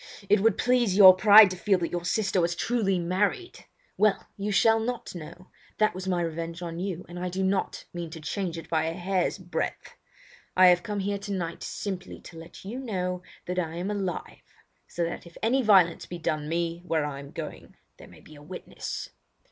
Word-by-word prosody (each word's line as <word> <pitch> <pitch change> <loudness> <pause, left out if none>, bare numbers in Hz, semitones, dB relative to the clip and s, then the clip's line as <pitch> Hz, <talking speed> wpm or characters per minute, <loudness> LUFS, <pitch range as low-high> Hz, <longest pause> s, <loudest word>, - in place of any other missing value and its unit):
It 210 - +5
would 225 +3 +3
please 245 -6 +2
your 190 -2 +10
pride 205 0 +8
to - - -4
feel 195 +2 +2
that 170 -2 -3
your 175 0 -3
sister 195 0 +1
was 170 0 0
truly 205 -3 0
married! 190 - -1 0.3
Well, 210 -2 +2
you 205 +1 -3
shall 225 +3 +4
not 240 +2 -4
know. 175 +2 -10 0.3
That 215 0 +2
was 185 +1 -6
my 180 -2 +1
revenge 165 +1 -5
on 170 0 -5
you, 180 -2 -4
and 175 +1 -8
I 180 0 -2
do 190 +2 -2
not 190 +1 -1
mean 170 -1 -5
to 160 0 -9
change 170 +2 -3
it 165 -1 -8
by 160 -1 0
a 165 - -2
hair's 185 +1 -1
breadth. 180 -2 -4 0.6
I 185 0 +8
have 180 0 +4
come 205 0 -3
here 200 +1 -2
tonight 190 -4 -4
simply 190 -2 -5
to 170 - -13
let 165 +3 -12
you 230 +6 -5
know 180 -7 -3 0.2
that 180 +1 -2
I 165 -2 -3
am 180 +4 -3
alive, 195 -4 -4 0.5
so 170 - -3
that 170 +1 -4
if 170 - -15
any 255 +4 +3
violence 190 -7 +4
be 175 - -6
done 155 -2 -2
me 170 0 -2
where 160 -4 0
I 140 -2 -5
am 140 0 -10
going - - -8 0.2
there - - -13
may - - -16
be 155 - -16
a 145 - -14
witness." 180 +5 -7
180 Hz, 205 wpm, -27 LUFS, 170-200 Hz, 0.6 s, your